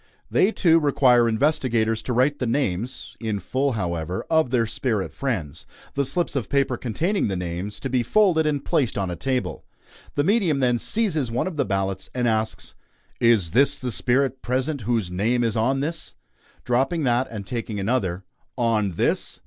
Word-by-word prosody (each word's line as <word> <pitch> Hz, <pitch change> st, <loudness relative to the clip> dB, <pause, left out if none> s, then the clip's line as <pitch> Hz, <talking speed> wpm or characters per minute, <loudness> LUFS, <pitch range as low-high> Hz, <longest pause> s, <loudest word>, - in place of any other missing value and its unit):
They, 200 Hz, -, +4 dB
too, 165 Hz, -6 st, +4 dB
require 125 Hz, -5 st, +4 dB
investigators 115 Hz, -3 st, +1 dB
to 125 Hz, -, -4 dB
write 135 Hz, +4 st, +2 dB
the 125 Hz, -, -1 dB
names 120 Hz, -1 st, -2 dB
in 110 Hz, -3 st, -2 dB
full, 130 Hz, +8 st, -1 dB
however 90 Hz, -4 st, -3 dB
of 160 Hz, -5 st, +3 dB
their 120 Hz, -2 st, +2 dB
spirit 110 Hz, -3 st, -2 dB
friends; 90 Hz, -, -3 dB, 0.3 s
the 140 Hz, -, +1 dB
slips 155 Hz, +4 st, -1 dB
of 125 Hz, -7 st, -2 dB
paper 140 Hz, -2 st, +1 dB
containing 165 Hz, -, -1 dB
the 95 Hz, -, -2 dB
names, 90 Hz, +3 st, -4 dB
to 135 Hz, -, -2 dB
be 130 Hz, -1 st, +1 dB
folded 160 Hz, -, +3 dB
and 145 Hz, -2 st, -1 dB
placed 145 Hz, -9 st, +1 dB
on 95 Hz, -3 st, -1 dB
a -, -, -3 dB
table. 130 Hz, +8 st, -2 dB, 0.5 s
The 145 Hz, -, +2 dB
medium 190 Hz, -5 st, +2 dB
then 125 Hz, -2 st, +2 dB
seizes 165 Hz, -, 0 dB
one 115 Hz, -, -1 dB
of 185 Hz, -3 st, -4 dB
the 140 Hz, -3 st, 0 dB
"ballots," 95 Hz, -1 st, -2 dB
and 125 Hz, -1 st, +1 dB
asks: 110 Hz, -1 st, -1 dB, 0.5 s
"Is 110 Hz, -8 st, +3 dB
the 135 Hz, +4 st, +5 dB
spirit 130 Hz, +1 st, 0 dB
present 130 Hz, +3 st, -1 dB
whose 110 Hz, -7 st, 0 dB
name 115 Hz, +7 st, +1 dB
is 115 Hz, -2 st, 0 dB
on 130 Hz, +5 st, +1 dB
this?" 160 Hz, +2 st, -4 dB, 0.5 s
Dropping 135 Hz, +7 st, +1 dB
that 125 Hz, 0 st, +2 dB
and 105 Hz, -3 st, -6 dB
taking 115 Hz, -2 st, -4 dB
another: 95 Hz, -4 st, -1 dB, 0.3 s
"On 110 Hz, -5 st, +1 dB
this?" -, -, -1 dB
125 Hz, 175 wpm, -24 LUFS, 110-140 Hz, 0.5 s, the